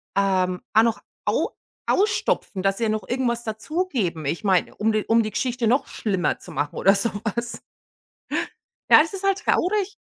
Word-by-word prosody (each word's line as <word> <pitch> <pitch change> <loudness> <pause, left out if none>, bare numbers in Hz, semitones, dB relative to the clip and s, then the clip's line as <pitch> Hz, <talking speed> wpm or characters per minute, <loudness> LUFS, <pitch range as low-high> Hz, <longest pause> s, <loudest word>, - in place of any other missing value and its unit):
ähm, 185 -2 +1
auch 220 - +6
noch 230 -1 0 0.2
au - - +1 0.4
ausstopfen, 395 - +1
dass 195 0 +1
sie 230 - 0
noch 215 0 -2
irgendwas 240 -2 0
dazugeben. 220 - -2
Ich 155 +8 -2
meine, 190 -3 +2
um 220 +1 +1
die 215 -1 0
um 230 0 +3
die 215 - -4
Geschichte 245 +2 -1
noch 260 +5 +2
schlimmer 190 -6 -1
zu - - -11
machen 145 +2 -2
oder 195 - +4
sowas. 225 +3 -2 1.3
Ja, - - +10
es 320 - -6
ist 390 - -5
halt 390 0 +2
traurig. 400 +2 +1
220 Hz, 165 wpm, -23 LUFS, 195-255 Hz, 1.3 s, Ja